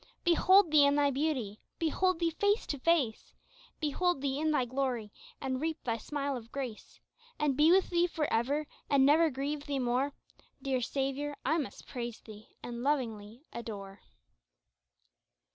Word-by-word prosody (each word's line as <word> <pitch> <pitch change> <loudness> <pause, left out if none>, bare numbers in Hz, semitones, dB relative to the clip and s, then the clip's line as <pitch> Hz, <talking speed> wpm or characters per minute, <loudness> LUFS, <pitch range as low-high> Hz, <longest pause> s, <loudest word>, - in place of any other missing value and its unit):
Behold 360 +1 +5
Thee 300 -2 +7
in 280 0 +4
Thy 285 -1 +3
beauty, 265 -8 -1 0.2
behold 360 +3 +1
Thee 335 -1 +1
face 405 +6 +1
to 285 - -4
face, 280 -7 0 0.4
Behold 335 +3 0
Thee 275 0 -1
in 315 +1 +1
Thy 295 -5 +2
glory 245 -4 -2 0.3
and 260 -1 -2
reap 320 0 -3
Thy 230 -2 -1
smile 280 +4 -3
of 230 -2 -9
grace 255 -6 -6 0.4
And 295 -3 +1
be 300 +4 +5
with 380 +1 +4
Thee 345 0 +3
for 320 -3 -2
ever, 275 +7 +1 0.2
and 275 -1 +5
never 315 +3 +5
grieve 285 +2 -4
Thee 285 -1 -1
more! 255 +2 0 0.5
Dear 265 -2 -1
Saviour 275 +3 -2
I 315 +5 +2
must 290 - -6
praise 240 -2 -5
Thee 215 -1 -13
and 240 0 -5
lovingly 235 -4 -2
adore. 200 -4 -7
280 Hz, 160 wpm, -31 LUFS, 245-310 Hz, 0.5 s, Thee